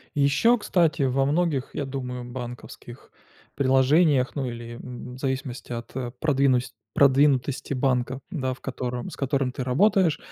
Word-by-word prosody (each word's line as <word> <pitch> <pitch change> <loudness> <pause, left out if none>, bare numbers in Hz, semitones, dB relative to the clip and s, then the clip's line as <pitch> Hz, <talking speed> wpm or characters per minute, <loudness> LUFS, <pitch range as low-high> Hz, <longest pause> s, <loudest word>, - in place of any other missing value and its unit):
Ещё, 145 +12 +4
кстати, 170 -7 +1
во 135 0 +2
многих, 150 -2 0
я 145 - -2
думаю, 125 -2 -5
банковских 120 0 -9 0.4
приложениях, 135 +1 +3
ну, 140 -3 -2
или 120 0 -8
м 125 0 -8
в - - -11
зависимости 130 -2 -4
от 115 -1 -6 0.3
продвиност 135 -4 +1 0.2
продвинутости 140 -1 +3
банка, 130 -1 0
да, 130 -7 -1
в 130 - -10
котором 125 -2 -4
с - - -9
которым 135 -1 0
ты 130 - -4
работаешь, 175 +6 +3
135 Hz, 140 wpm, -25 LUFS, 125-145 Hz, 0.4 s, Ещё